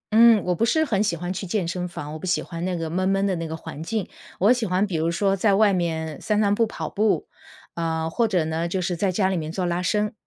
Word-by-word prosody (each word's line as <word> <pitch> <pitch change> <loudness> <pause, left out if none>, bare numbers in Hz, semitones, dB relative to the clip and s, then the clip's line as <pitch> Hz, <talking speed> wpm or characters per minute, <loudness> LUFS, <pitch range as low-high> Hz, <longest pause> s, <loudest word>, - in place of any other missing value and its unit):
嗯， 225 -2 +7
我 180 - +1
不 200 +7 +1
是 315 +7 +2
很 210 -10 0
喜 210 -5 +1
欢 175 +2 -4
去 190 +1 -4
健 190 0 -1
身 180 +1 -3
房， 150 -4 -7
我 155 - -6
不 - - -7
喜 180 -1 +1
欢 170 0 -5
那 185 -1 -1
个 165 -2 -3
闷 185 +3 0
闷 195 0 +2
的 195 - +1
那 165 0 -4
个 160 - -4
环 155 -2 -8
境。 210 +3 -3 0.3
我 205 +5 +5
喜 245 -2 +2
欢 185 +1 +1
比 185 -5 -3
如 160 +1 +1
说 195 +3 +1
在 200 +1 +3
外 210 0 +5
面 160 -4 -2
散 210 -1 +1
散 200 -1 +3
步， 225 +2 +2
跑 - - -5
步， 215 0 +1 0.5
呃， 160 -1 -1
或 230 +7 +1
者 185 -6 +1
呢， 160 +2 -2
就 185 +2 -2
是 175 -1 -2
在 195 +3 +1
家 190 0 +2
里 190 - 0
面 155 -2 -3
做 185 0 -1
拉 175 0 -1
伸， 210 +5 0
185 Hz, 300 characters per minute, -24 LUFS, 165-210 Hz, 0.5 s, 嗯